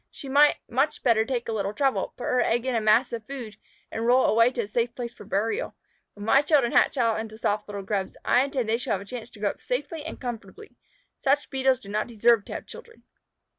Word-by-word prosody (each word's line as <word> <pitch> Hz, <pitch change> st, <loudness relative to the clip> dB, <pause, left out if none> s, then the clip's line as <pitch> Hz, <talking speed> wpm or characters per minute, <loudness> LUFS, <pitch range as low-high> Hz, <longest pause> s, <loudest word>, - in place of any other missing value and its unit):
She 275 Hz, -, -10 dB
might 290 Hz, +2 st, +5 dB
much 270 Hz, +5 st, 0 dB
better 230 Hz, -4 st, +4 dB
take 245 Hz, -1 st, -3 dB
a -, -, -2 dB
little 205 Hz, -1 st, -2 dB
trouble, 275 Hz, -2 st, 0 dB
put -, -, -7 dB
her 250 Hz, -, +1 dB
egg 240 Hz, +1 st, +1 dB
in 260 Hz, -, 0 dB
a 230 Hz, -, +1 dB
mass 220 Hz, +4 st, +3 dB
of 230 Hz, -1 st, -4 dB
food, 240 Hz, -7 st, -7 dB, 0.3 s
and 225 Hz, -, -3 dB
roll 250 Hz, +2 st, +4 dB
it -, -, +3 dB
away 230 Hz, +2 st, +4 dB
to 240 Hz, -, -1 dB
a -, -, -7 dB
safe 235 Hz, +3 st, -1 dB
place 240 Hz, -1 st, -5 dB
for 210 Hz, -, -13 dB
burial. 220 Hz, -, -1 dB, 0.4 s
When 205 Hz, 0 st, -8 dB
my 270 Hz, +5 st, +5 dB
children 285 Hz, -5 st, +3 dB
hatch -, -, +3 dB
out 230 Hz, -3 st, +2 dB
into 220 Hz, -1 st, -7 dB
soft 210 Hz, -1 st, -1 dB
little 200 Hz, -1 st, -6 dB
Grubs, 195 Hz, -1 st, -3 dB
I 250 Hz, -, +4 dB
intend 270 Hz, -4 st, -2 dB
they 225 Hz, +1 st, +1 dB
shall 245 Hz, -, -2 dB
have 195 Hz, -, -2 dB
a -, -, -10 dB
chance 240 Hz, +2 st, -7 dB
to 225 Hz, -, -16 dB
grow 205 Hz, -1 st, +1 dB
up -, -, -18 dB
safely 290 Hz, +5 st, -3 dB
and 320 Hz, -, -7 dB
comfortably. 250 Hz, -, -8 dB, 0.4 s
Such 280 Hz, +2 st, +1 dB
Beetles 265 Hz, -1 st, +2 dB
do 200 Hz, -, -13 dB
not 210 Hz, +1 st, -1 dB
deserve 230 Hz, -2 st, +3 dB
to -, -, -7 dB
have -, -, -6 dB
children." 455 Hz, -, -13 dB
235 Hz, 245 wpm, -26 LUFS, 215-265 Hz, 0.4 s, might